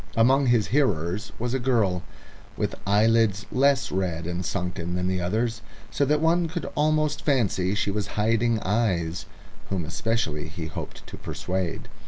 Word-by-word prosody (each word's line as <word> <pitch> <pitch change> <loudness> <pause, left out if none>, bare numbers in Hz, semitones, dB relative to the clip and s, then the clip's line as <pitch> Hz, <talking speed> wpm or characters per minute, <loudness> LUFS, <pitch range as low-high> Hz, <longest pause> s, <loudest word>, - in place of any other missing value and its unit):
Among 130 +4 +4
his 120 -4 +3
hearers 100 - +1
was 120 +1 -2
a 135 - +1
girl, 110 -8 +1 0.6
with - - -1
eyelids 105 -1 +3
less 135 0 +3
red 90 -3 -1
and 90 +1 -3
sunken 90 0 -3
than 90 0 -1
the 95 -1 0
others, 110 +6 -1 0.3
so 140 - +1
that 150 +2 +2
one 165 +1 +3
could 165 0 -4
almost 155 0 +1
fancy 105 -9 +1
she 105 - 0
was 105 0 -2
hiding 115 +2 +2
eyes, 90 -7 0 0.4
whom 95 -4 -1
especially 85 -3 -1
he 80 +1 -6
hoped 80 - -7
to - - -9
persuade. 90 -2 -3
105 Hz, 155 wpm, -25 LUFS, 90-120 Hz, 0.6 s, Among